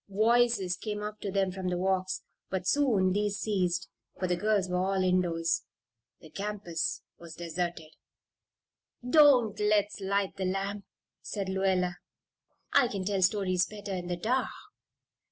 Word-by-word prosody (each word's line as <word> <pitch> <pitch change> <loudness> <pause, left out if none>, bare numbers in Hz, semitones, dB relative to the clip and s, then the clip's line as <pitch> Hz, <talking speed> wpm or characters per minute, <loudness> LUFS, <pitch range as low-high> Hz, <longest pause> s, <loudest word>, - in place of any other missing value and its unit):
Voices 220 -2 +3
came 210 +1 -4
up 210 0 -5
to 200 - -4
them 195 -1 +1
from 185 0 -5
the 180 -1 0
walks; 185 0 0 0.3
but 190 -1 -2
soon 220 -8 +3
these 205 0 0
ceased, 180 -4 0 0.3
for 185 - -2
the 180 - +1
girls 205 0 +1
were 180 0 -1
all 190 0 +1
indoors. 170 -3 +1 0.6
The 160 - -14
campus 200 -5 -3 0.2
was 170 -2 -10
deserted. 170 -1 -4 1.1
"Don't 255 -6 +5
let's 210 0 +2
light 195 0 -1
the 190 - -2
lamp," 195 +2 -2 0.4
said 200 -3 -4
Lluella. 190 -2 +1 0.8
"I 260 - +5
can 195 -4 -4
tell 195 -1 0
stories 185 -2 +2
better 205 -2 -7
in 180 -1 -4
the 175 0 -2
dark." 250 +8 0
190 Hz, 145 wpm, -29 LUFS, 180-210 Hz, 1.1 s, Don't